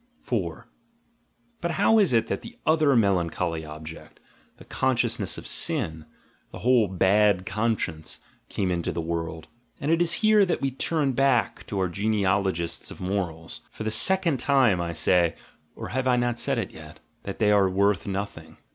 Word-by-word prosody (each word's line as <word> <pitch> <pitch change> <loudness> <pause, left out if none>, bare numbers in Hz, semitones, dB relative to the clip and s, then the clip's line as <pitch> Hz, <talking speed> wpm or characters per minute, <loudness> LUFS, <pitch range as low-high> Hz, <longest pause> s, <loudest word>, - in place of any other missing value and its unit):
But 170 - -1
how 220 +7 +4
is 195 -8 +3
it 115 -2 +3
that - - -3
that 230 - -11
other 155 -3 +3
melancholy 90 -6 0
object, 80 +1 -10 0.4
the - - -15
consciousness 120 -6 -1
of - - -9
sin, 80 -1 -2 0.4
the - - -8
whole 125 -4 +4
"bad 95 +1 +2
conscience," 105 -8 -2 0.3
came 95 -2 -1
into 85 -1 -2
the - - -4
world? 80 -1 -4 0.3
And 145 - -1
it 165 +1 +2
is 170 -1 +3
here 215 -1 +6
that 180 - 0
we 135 - -1
turn 145 +1 0
back 130 -2 +1
to 100 - -4
our 95 -1 +1
genealogists 95 -3 -1
of - - -11
morals. 90 -4 -4
For - - -8
the 110 - -1
second 170 - +4
time 125 -9 +3
I 85 -1 -3
say 85 +1 +2 0.2
— - - -39
or - - -7
have 130 0 -2
I 125 - +4
not 120 -1 -1
said - - 0
it - - -3
yet? - - -13
— - - -41
that 100 - -5
they 105 -2 +3
are 100 -2 +4
worth 100 +1 +1
nothing. 100 +1 -5
105 Hz, 175 wpm, -25 LUFS, 90-130 Hz, 0.4 s, here